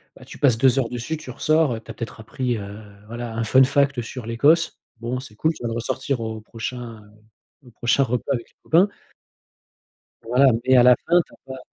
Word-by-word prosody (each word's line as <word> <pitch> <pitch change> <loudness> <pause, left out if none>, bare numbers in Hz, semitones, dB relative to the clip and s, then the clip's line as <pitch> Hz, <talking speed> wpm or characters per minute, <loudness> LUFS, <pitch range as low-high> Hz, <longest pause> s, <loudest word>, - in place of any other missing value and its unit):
bah, - - -15
tu - - -11
passes 130 -6 +4
2 130 +2 +4
heures 115 -3 -1
dessus 125 +6 -4
tu 155 - -11
ressors, 155 -4 +2
heu, 110 - -6
tu 115 - -10
as - - -8
peut-être 115 0 -7
appris, 120 +2 -3
heu, 100 +1 -8 0.3
voilà, 120 0 -6
un 115 - -1
fun 130 +5 +5
fact 140 -1 +2
sur 115 +1 -8
l'Écosse, 145 +9 +2 0.2
bon, 120 +2 -3
c'est 125 -5 -12
cool, 160 +8 +1
tu - - -12
vas - - -1
le 115 - -4
ressortir 120 +2 -2
au 110 -1 -5
prochain, 115 0 -7
heu, 110 +5 -26
au - - -15
prochain 120 +5 +1
repas 125 +3 -1
avec 120 -3 -4
les - - -34
copains 175 +5 +4 1.4
voilà, 125 +4 +4 0.2
mais 130 - +5
à 125 - +7
la 125 0 +7
fin, 175 +1 +5
tu - - -23
as - - -17
pas 130 0 -8
120 Hz, 225 wpm, -22 LUFS, 115-135 Hz, 1.4 s, à